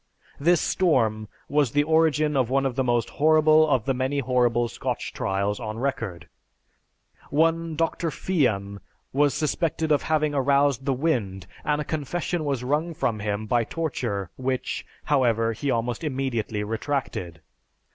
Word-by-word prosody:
This 170 +4 +4
storm 110 - +1 0.2
was 145 -3 +2
the 145 0 +3
origin 155 -1 +2
of 130 -3 +2
one 135 +1 +1
of 130 -3 -1
the 130 - +1
most 120 -2 +1
horrible 155 0 +5
of 130 -6 +2
the 135 - +1
many 130 +2 -1
horrible 120 -3 +2
Scotch - - -4
trials 100 +1 -1
on 110 -2 -5
record. 115 - -3 1.0
One 165 +2 +1
Dr. 165 +1 0
Fian 110 - -1 0.3
was 145 +1 +3
suspected 160 0 -1
of 145 - +4
having 155 -1 +1
aroused 140 -1 +2
the 140 - +1
wind 115 - -1 0.2
and 150 0 0
a - - -1
confession 155 +2 -2
was 135 -4 -1
wrung 155 +6 -1
from 115 -9 -1
him 105 +1 -2
by 120 +2 +2
torture 115 - -3
which, 130 0 -3 0.2
however, 115 -5 +2
he 140 +6 -3
almost 120 +3 -1
immediately 130 -7 -2
retracted. 110 - -3
135 Hz, 145 wpm, -25 LUFS, 115-155 Hz, 1.0 s, horrible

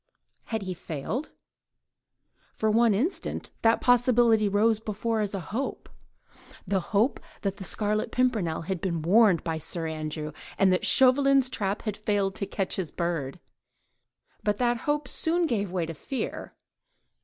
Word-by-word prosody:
Had 220 -3 -3
he 185 -1 -3
failed? 175 - -4 1.3
For 220 0 +1
one 225 -1 +4
instant 300 - -2
that 225 0 +3
possibility 240 -3 +4
rose 215 +2 +3
before 220 +1 -2
her - - +1
as 205 -1 -2
a - - -2
hope—the 200 - -6
hope 215 +7 +1 0.2
that 195 -1 -2
the 200 - -7
Scarlet 210 +2 0
Pimpernel 220 -12 0
had 180 0 -3
been 170 -4 -2
warned 195 -1 +5
by 160 -1 -2
Sir 165 +1 -3
Andrew, 155 -1 -4 0.3
and 190 -1 +4
that 180 - 0
Chauvelin's 270 0 +5
trap 205 -5 -2
had 215 -3 -2
failed 205 -2 0
to 200 - -3
catch 195 -1 -2
his 180 -5 -2
bird; 170 -3 -3 1.0
but 205 -1 +1
that 240 -1 +1
hope 295 -2 0
soon 340 +5 +1
gave 205 - -1
way 180 -3 -1
to 165 - -6
fear. 255 - -5
205 Hz, 150 wpm, -27 LUFS, 180-235 Hz, 1.3 s, warned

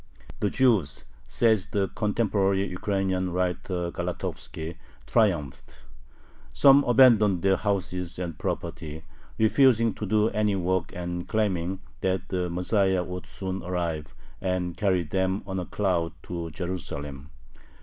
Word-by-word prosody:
The 105 - +1
Jews 110 - +2 0.2
says 110 -4 +2
the 100 -2 0
contemporary 100 -3 +1
Ukrainian 95 0 -1
writer 90 0 -1
Galatovski 85 -2 -5 0.3
triumphed. 90 - 0 0.7
Some 140 0 +6
abandoned 110 -7 +5
their 95 0 +4
houses 90 -3 -2
and 85 -3 -4
property, 80 +2 -4 0.3
refusing 115 -1 +4
to 105 - -5
do 110 +2 +3
any 105 -1 +1
work 95 -1 0
and 90 0 -4
claiming 95 -4 -1 0.2
that 95 0 -1
the 90 -2 -1
Messiah 95 +1 +1
would 90 +1 -7
soon 95 0 -5
arrive 85 -6 -3 0.3
and 90 -2 -1
carry 95 -2 +1
them 95 +4 -1
on 95 -1 -3
a 90 - -5
cloud 85 -5 0
to 85 -1 -5
Jerusalem. 75 -5 -5
95 Hz, 120 wpm, -26 LUFS, 85-100 Hz, 0.7 s, Some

